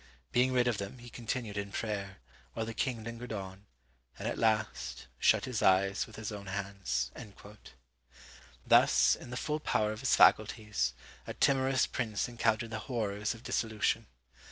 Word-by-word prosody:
Being 125 Hz, +1 st, +3 dB
rid 125 Hz, -1 st, +3 dB
of 120 Hz, -4 st, 0 dB
them, 100 Hz, +5 st, -5 dB
he 120 Hz, -1 st, -12 dB
continued 115 Hz, -3 st, -3 dB
in 100 Hz, 0 st, -5 dB
prayer, 100 Hz, -4 st, -3 dB, 0.4 s
while 115 Hz, -, -2 dB
the 115 Hz, -, -5 dB
king 115 Hz, +1 st, -2 dB
lingered 115 Hz, +1 st, -7 dB
on, 95 Hz, -1 st, -7 dB, 0.5 s
and -, -, -4 dB
at -, -, -2 dB
last 110 Hz, -, 0 dB
shut -, -, +4 dB
his 125 Hz, -4 st, -2 dB
eyes 95 Hz, +2 st, +3 dB
with -, -, -13 dB
his 110 Hz, -1 st, -5 dB
own 100 Hz, -1 st, -7 dB
hands." 95 Hz, -10 st, -2 dB, 1.5 s
Thus, -, -, +6 dB
in -, -, -11 dB
the 125 Hz, -, -5 dB
full 150 Hz, +3 st, -1 dB
power 105 Hz, -7 st, +1 dB
of 110 Hz, -, -6 dB
his 135 Hz, -, +3 dB
faculties, 105 Hz, -, +3 dB, 0.3 s
a -, -, -5 dB
timorous 135 Hz, -1 st, +3 dB
prince 110 Hz, -5 st, -2 dB
encountered 115 Hz, -1 st, 0 dB
the 110 Hz, -, -3 dB
horrors 105 Hz, -3 st, -1 dB
of 115 Hz, -, -14 dB
dissolution. 110 Hz, -4 st, 0 dB
110 Hz, 160 wpm, -32 LUFS, 100-120 Hz, 1.5 s, Thus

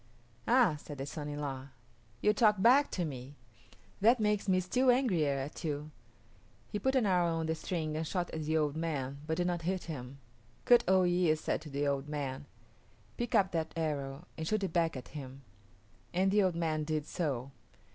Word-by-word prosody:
"Ah," 235 Hz, -10 st, +4 dB
said 145 Hz, -1 st, -9 dB
the 135 Hz, -, -4 dB
son 150 Hz, 0 st, -5 dB
in 145 Hz, -, -5 dB
law, 135 Hz, -2 st, -4 dB, 0.5 s
"you 210 Hz, -, +4 dB
talk 210 Hz, -2 st, +4 dB
back 255 Hz, +8 st, +5 dB
to 180 Hz, -, -2 dB
me. 135 Hz, -1 st, -7 dB, 0.6 s
That 230 Hz, +4 st, +5 dB
makes 210 Hz, -2 st, +1 dB
me 185 Hz, -1 st, +4 dB
still 250 Hz, +8 st, +1 dB
angrier 180 Hz, -, +3 dB
at 135 Hz, +6 st, -5 dB
you." 150 Hz, -1 st, -3 dB, 0.8 s
He 210 Hz, -, -2 dB
put 265 Hz, +6 st, +1 dB
an 255 Hz, -4 st, +3 dB
arrow 175 Hz, -3 st, +2 dB
on 165 Hz, 0 st, -1 dB
the 160 Hz, -, 0 dB
string 160 Hz, -1 st, -3 dB
and 160 Hz, 0 st, -2 dB
shot 180 Hz, 0 st, -2 dB
at 160 Hz, -, -4 dB
the 160 Hz, +1 st, +1 dB
old 150 Hz, -2 st, 0 dB
man, 140 Hz, -4 st, -3 dB
but 160 Hz, 0 st, -1 dB
did 175 Hz, -, +1 dB
not 175 Hz, -1 st, -1 dB
hit 185 Hz, +2 st, -2 dB
him. 135 Hz, -4 st, -7 dB, 0.5 s
Kut 240 Hz, -1 st, +6 dB
o 190 Hz, 0 st, +5 dB
yis´ 175 Hz, -3 st, +3 dB
said -, -, -2 dB
to 155 Hz, -, -9 dB
the 140 Hz, +1 st, -1 dB
old 140 Hz, +1 st, -1 dB
man, 140 Hz, -1 st, -4 dB, 0.7 s
"Pick 240 Hz, -2 st, -2 dB
up 190 Hz, -1 st, +4 dB
that 160 Hz, -2 st, -2 dB
arrow 145 Hz, -2 st, -3 dB
and 160 Hz, -, -3 dB
shoot 215 Hz, +1 st, 0 dB
it 185 Hz, -, -2 dB
back 165 Hz, -4 st, +1 dB
at 125 Hz, -, -9 dB
him"; 135 Hz, -2 st, -9 dB, 0.7 s
and 190 Hz, +2 st, +3 dB
the 210 Hz, +1 st, +4 dB
old 185 Hz, -3 st, +2 dB
man 160 Hz, -2 st, 0 dB
did 155 Hz, -1 st, -2 dB
so. 140 Hz, -7 st, -3 dB
160 Hz, 200 wpm, -32 LUFS, 145-190 Hz, 0.8 s, Kut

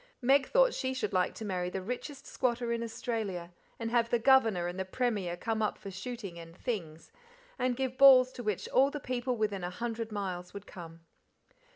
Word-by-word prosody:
Meg 265 Hz, +1 st, +4 dB
thought -, -, +4 dB
she 260 Hz, -1 st, -2 dB
should 260 Hz, -, -2 dB
like 180 Hz, -1 st, +1 dB
to 220 Hz, -, -6 dB
marry 180 Hz, -3 st, -2 dB
the 190 Hz, -, -3 dB
richest 250 Hz, +6 st, -6 dB
squatter 240 Hz, -2 st, -1 dB
in 230 Hz, -, -2 dB
Australia, 220 Hz, -6 st, -4 dB, 0.3 s
and 225 Hz, -1 st, -4 dB
have 235 Hz, -1 st, +2 dB
the 240 Hz, -, +3 dB
Governor 225 Hz, -7 st, +4 dB
and 175 Hz, +2 st, -4 dB
the -, -, 0 dB
Premier 190 Hz, -4 st, -1 dB
come 220 Hz, +3 st, -2 dB
up 215 Hz, -, 0 dB
for 195 Hz, -, -8 dB
shooting 195 Hz, -2 st, -6 dB
and 165 Hz, +1 st, -12 dB
"things," 170 Hz, -11 st, -5 dB, 0.5 s
and 250 Hz, -1 st, 0 dB
give 260 Hz, -1 st, -2 dB
balls 260 Hz, -2 st, +8 dB
to 250 Hz, -, -8 dB
which 210 Hz, -5 st, -2 dB
all 270 Hz, +2 st, +4 dB
the 295 Hz, -, -5 dB
people 250 Hz, -1 st, -2 dB
within 205 Hz, -4 st, -1 dB
a 175 Hz, -, -2 dB
hundred 230 Hz, +3 st, -4 dB
miles 185 Hz, -3 st, -4 dB
would 200 Hz, 0 st, -7 dB
come. 165 Hz, -2 st, -11 dB
225 Hz, 200 wpm, -31 LUFS, 185-250 Hz, 0.5 s, balls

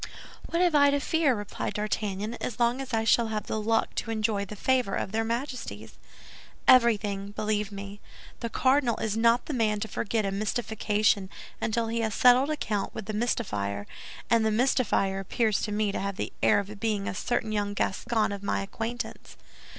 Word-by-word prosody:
"What 340 Hz, +2 st, +1 dB
have 350 Hz, -2 st, +3 dB
I 285 Hz, -1 st, +6 dB
to 285 Hz, 0 st, +2 dB
fear," 295 Hz, -3 st, +2 dB
replied 205 Hz, 0 st, -4 dB
D'Artagnan, 210 Hz, 0 st, -2 dB
"as 240 Hz, -, -4 dB
long 240 Hz, +2 st, +2 dB
as 265 Hz, -1 st, -7 dB
I 225 Hz, -1 st, +1 dB
shall 225 Hz, +1 st, +3 dB
have 215 Hz, -1 st, -3 dB
the 215 Hz, -, -2 dB
luck 225 Hz, +1 st, +1 dB
to -, -, -2 dB
enjoy 215 Hz, -2 st, 0 dB
the 210 Hz, -, -8 dB
favor 250 Hz, -1 st, +1 dB
of -, -, -3 dB
their 225 Hz, +1 st, 0 dB
Majesties?" 245 Hz, +3 st, -4 dB, 0.7 s
"Everything, 205 Hz, -5 st, +4 dB
believe 210 Hz, -1 st, -1 dB
me. 200 Hz, 0 st, -8 dB, 0.4 s
The 235 Hz, -, -3 dB
cardinal 260 Hz, 0 st, +2 dB
is 220 Hz, -1 st, -2 dB
not 230 Hz, +2 st, +3 dB
the 300 Hz, -, -4 dB
man 215 Hz, -4 st, +1 dB
to 220 Hz, -, -2 dB
forget 215 Hz, +1 st, -1 dB
a 195 Hz, -, -1 dB
mystification 210 Hz, -1 st, 0 dB, 0.3 s
until 230 Hz, +1 st, 0 dB
he 230 Hz, +1 st, -1 dB
has 220 Hz, -2 st, -1 dB
settled 250 Hz, +3 st, +5 dB
account 215 Hz, -10 st, -2 dB
with 215 Hz, -, -5 dB
the 215 Hz, -, -4 dB
mystifier; 105 Hz, -, -1 dB, 0.4 s
and 230 Hz, -1 st, +3 dB
the 220 Hz, -, +2 dB
mystifier 220 Hz, -4 st, +1 dB
appears 215 Hz, +2 st, 0 dB
to 210 Hz, -, -2 dB
me 210 Hz, 0 st, 0 dB
to -, -, -3 dB
have 200 Hz, 0 st, -3 dB
the -, -, -4 dB
air -, -, +5 dB
of 205 Hz, +1 st, -4 dB
being 210 Hz, -3 st, -1 dB
a -, -, -2 dB
certain 220 Hz, +2 st, -1 dB
young 205 Hz, -1 st, -1 dB
Gascon 220 Hz, +2 st, 0 dB
of 200 Hz, -1 st, -5 dB
my 200 Hz, -, -1 dB
acquaintance." 230 Hz, +4 st, -6 dB
220 Hz, 190 wpm, -27 LUFS, 205-235 Hz, 0.7 s, I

